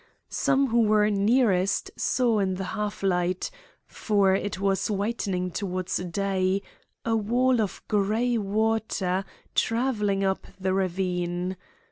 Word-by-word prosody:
Some 275 -1 +2
who 235 +1 +3
were 210 -1 +3
nearest 205 - +2
saw 235 -4 +1
in 190 -2 0
the 190 - -4
half 210 -2 -3
light 180 -1 0 0.3
for 200 -3 +2
it 195 0 -2
was 195 +1 +1
whitening 200 -3 -1
towards 185 -1 -2
day 190 +2 0 0.4
a 225 -1 +2
wall 240 +3 +2
of 200 -3 -3
gray 215 +4 +1
water 210 -3 0 0.3
travelling 220 -5 +1
up 190 0 -1
the 185 0 0
ravine. 180 -1 -1
200 Hz, 120 wpm, -26 LUFS, 185-220 Hz, 0.4 s, who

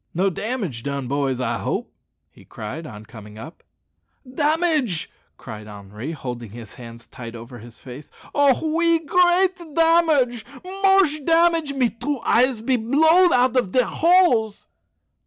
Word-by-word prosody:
"No 190 +3 +1
damage 200 - -4
done, 140 0 -4
boys, 135 -1 -1
I 120 -2 -2
hope?" - - -4 0.4
he - - -19
cried 135 +10 -8
on 105 -3 -11
coming 105 -1 -13
up. 150 +9 -11 0.7
"Damage!" 295 - 0 0.3
cried 110 -3 -10
Henri, 105 +6 -8
holding 125 -6 -7
his 115 0 -11
hands 115 -2 -12
tight 120 -2 -10
over 120 +1 -11
his 115 0 -13
face. 130 +5 -12 0.2
"Oh! 285 -2 +3
oui, 335 0 +3
great 360 +3 +2 0.2
damage 320 -8 +2 0.2
moche 385 -5 +1
damage; 330 -2 +2
me 255 -4 0
two 260 +4 -4
eyes 245 0 +1
be 255 +2 0
blowed 320 +10 +3
out 250 0 +2
of 240 -8 0
dere 255 -2 +3
holes." 330 - +2
230 Hz, 140 wpm, -21 LUFS, -, 0.7 s, Oh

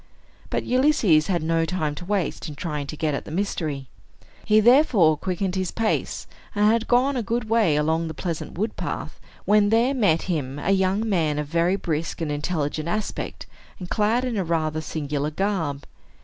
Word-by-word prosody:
But - - -1
Ulysses 250 - +3
had 175 -4 0
no 165 0 +1
time 160 -3 -1
to 175 - -8
waste 190 -4 -2
in 150 - -8
trying 150 -2 -4
to 155 - -6
get 155 -1 0
at 140 - -3
the - - -9
mystery. 155 -6 -2 0.6
He 215 0 +5
therefore 230 - +5
quickened 185 +3 -2
his 185 -2 -1
pace, 225 -1 -1 0.3
and 205 0 +3
had 225 +1 +3
gone 260 +3 +3
a 250 - 0
good 230 +1 -2
way 220 -8 +3
along 160 +2 +1
the 160 - -6
pleasant 170 -2 -5
wood 215 +5 -2
path, - - -5 0.3
when 205 0 +4
there 230 +5 +3
met 200 -11 +2
him 145 -7 -2
a 160 +6 -1
young 195 +3 +1
man 160 -7 +1
of 150 - -1
very 170 +5 +1
brisk 165 -4 -3
and 160 -3 -2
intelligent 150 +1 -2
aspect, 215 +4 -3 0.3
and 180 -1 -9
clad 225 +3 +2
in 240 -4 -2
a 195 - +1
rather 155 -2 -1
singular 150 -2 -3
garb. 160 -6 -2
175 Hz, 185 wpm, -24 LUFS, 155-210 Hz, 0.6 s, He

